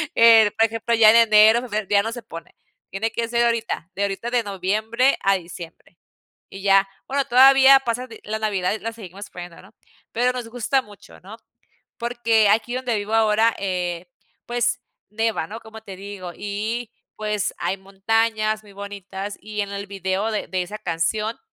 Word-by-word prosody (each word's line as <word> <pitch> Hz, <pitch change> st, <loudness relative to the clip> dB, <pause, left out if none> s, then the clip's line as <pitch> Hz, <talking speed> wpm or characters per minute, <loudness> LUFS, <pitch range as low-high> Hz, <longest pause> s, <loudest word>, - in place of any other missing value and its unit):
Eh, 225 Hz, -2 st, +7 dB
por 225 Hz, -, +5 dB
ejemplo, 225 Hz, +1 st, -3 dB
ya 220 Hz, -1 st, +7 dB
en -, -, +3 dB
enero, 225 Hz, +2 st, +5 dB, 0.2 s
ya 200 Hz, -1 st, +3 dB
no 225 Hz, -, -3 dB
se 240 Hz, +1 st, -7 dB
pone. 165 Hz, 0 st, -11 dB, 0.4 s
Tiene 220 Hz, +4 st, -2 dB
que 230 Hz, 0 st, -2 dB
ser 235 Hz, 0 st, +2 dB
ahorita, 230 Hz, -7 st, -2 dB
de 195 Hz, -, -4 dB
ahorita 200 Hz, +4 st, -3 dB
de 245 Hz, -1 st, +1 dB
noviembre 215 Hz, +6 st, 0 dB
a 195 Hz, 0 st, +4 dB
diciembre. 170 Hz, -1 st, -11 dB, 0.5 s
Y 195 Hz, -, -10 dB
ya, 195 Hz, 0 st, +4 dB, 0.2 s
bueno, 275 Hz, 0 st, 0 dB
todavía 270 Hz, +2 st, +7 dB
pasa, 250 Hz, 0 st, -3 dB, 0.2 s
la 220 Hz, +1 st, -4 dB
Navidad 200 Hz, -4 st, -1 dB
y 220 Hz, -, -4 dB
la 230 Hz, +1 st, -5 dB
seguimos 200 Hz, -2 st, -10 dB
poniendo, 175 Hz, -1 st, -10 dB
¿no? 195 Hz, +4 st, -19 dB, 0.4 s
Pero 245 Hz, +2 st, +2 dB
nos 250 Hz, -2 st, -5 dB
gusta 245 Hz, +3 st, 0 dB
mucho, 205 Hz, -5 st, -16 dB
¿no? 200 Hz, +4 st, -11 dB, 0.6 s
Porque 235 Hz, -2 st, +2 dB
aquí 225 Hz, +4 st, +1 dB
donde 255 Hz, -2 st, -1 dB
vivo 205 Hz, +2 st, -4 dB
ahora, 220 Hz, +1 st, +3 dB
eh, 180 Hz, -2 st, -3 dB, 0.4 s
pues, 240 Hz, -1 st, -1 dB, 0.3 s
nieva, 225 Hz, -5 st, -1 dB
¿no? 220 Hz, +4 st, -8 dB
Como 220 Hz, 0 st, -12 dB
te 200 Hz, -3 st, -10 dB
digo, 195 Hz, -2 st, -8 dB
y, 215 Hz, +3 st, -4 dB, 0.2 s
pues, 210 Hz, -2 st, -2 dB
hay 195 Hz, -, -2 dB
montañas 215 Hz, +3 st, -1 dB
muy 205 Hz, -2 st, -16 dB
bonitas, 200 Hz, 0 st, -7 dB
y 210 Hz, -1 st, -4 dB
en 200 Hz, -1 st, -4 dB
el 200 Hz, 0 st, -6 dB
video 195 Hz, +2 st, -2 dB
de 215 Hz, -, -3 dB
de 185 Hz, -1 st, -2 dB
esa 205 Hz, +4 st, -8 dB
canción, 210 Hz, +8 st, -2 dB
215 Hz, 175 wpm, -22 LUFS, 195-230 Hz, 0.6 s, Eh